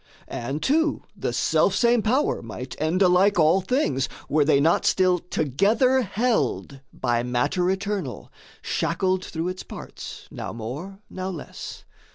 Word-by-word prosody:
And, 135 +4 -4
too, 320 - +2
the - - -2
selfsame 240 -1 +3
power 255 +7 +1
might 125 +3 -7
end 170 +5 +2
alike 185 +2 +4
All 165 +3 +4
things, 180 - 0 0.2
were 150 0 +3
they 145 -1 +4
not 160 +4 +3
still 185 -1 +3
together 200 - +2
held 215 - -1
By 120 -2 0
matter 135 +9 0
eternal, 200 +1 -3 0.3
shackled 185 -1 0
through 165 0 -3
its 185 0 -5
parts, - - -9
Now - - -6
more, 145 - -7
now 185 0 -5
less. 170 -6 -8
180 Hz, 135 wpm, -24 LUFS, 145-200 Hz, 0.3 s, alike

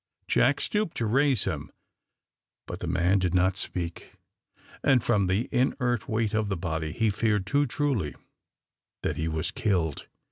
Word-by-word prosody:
Jack 135 +3 +3
stooped 210 -5 -1
to 115 - 0
raise 135 +1 +2
him, 75 -7 -4 0.9
but - - -6
the - - -4
man 90 +3 +2
did 90 -1 0
not 95 +1 +3
speak, 85 -3 -4 0.7
and 130 -4 +4
from 100 -2 +2
the 95 +6 0
inert 125 -2 0
weight 110 -1 0
of 110 -1 0
the 95 - -1
body, 80 -2 -3
he 110 +5 +1
feared 105 -1 +1
too 145 +8 +2
truly 130 - -1 0.9
that - - -1
he 80 - -1
was 80 +1 -2
killed. 90 -9 -1
100 Hz, 155 wpm, -27 LUFS, 90-125 Hz, 0.9 s, and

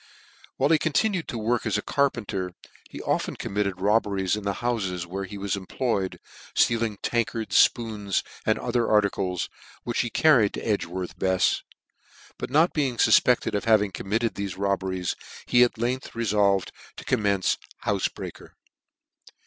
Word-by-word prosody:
While 140 +4 +2
he 160 - +5
con|ir.ued 180 +3 +1
to 120 - -4
work 115 +2 0
as 105 -2 0
a 105 - -3
capenter 105 -10 -1 0.3
he - - -8
often - - -1
committed: 100 -2 -2
robberies 100 -1 +1
in 105 - -5
the 100 -1 -1
houfes 95 -8 -2
where 95 +3 -4
he 100 +2 -8
was 100 0 -1
employed, 100 0 -2 0.4
ftealing 115 -3 +2
tankards, 115 -2 +3
fpoons, 105 -4 -3 0.2
and - - +2
other 120 -1 0
articles, 100 -4 +1 0.4
which 120 - -2
he 120 - -2
carried 125 -7 +4
toEdgworta 95 -4 -3
Befs; 95 -1 +2 0.8
but - - -4
net 155 +6 +3
being 135 -6 0
fufpedted 120 -2 +4
of 100 - -1
having 105 -3 +4
committed 105 +6 -1
thefe 100 -2 -5
robberies, 95 -2 -1 0.3
he 120 - +4
at 120 -1 +4
length 125 +3 -2
refolved 100 -5 +2 0.3
to - - -9
commence 100 -3 +1 0.3
houfe - - +1
breaker. - - -9
105 Hz, 145 wpm, -26 LUFS, 95-120 Hz, 0.8 s, he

